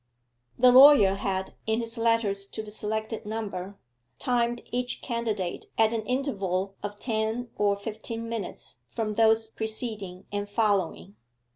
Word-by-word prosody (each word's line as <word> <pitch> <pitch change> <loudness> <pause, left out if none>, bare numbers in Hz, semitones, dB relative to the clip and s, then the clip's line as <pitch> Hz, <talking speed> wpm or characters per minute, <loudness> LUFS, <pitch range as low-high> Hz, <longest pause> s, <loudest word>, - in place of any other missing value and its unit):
The 250 0 +7
lawyer 260 -6 +8
had, 195 -1 -2
in 220 +1 +1
his 230 0 -4
letters 225 -4 +1
to 220 - -6
the 210 - -10
selected 220 +1 -3
number, 200 -3 -5 0.4
timed 240 -1 0
each 245 0 -2
candidate 220 -7 -2
at 225 0 +4
an 225 - 0
interval 195 -8 -1
of 205 0 -6
ten 225 +1 -2
or 205 -1 +2
fifteen 225 +2 -5
minutes 225 - -5
from 215 - -2
those 225 0 +4
preceding 220 -4 -5
and 205 0 -3
following. 185 - 0
220 Hz, 135 wpm, -27 LUFS, 200-230 Hz, 0.4 s, lawyer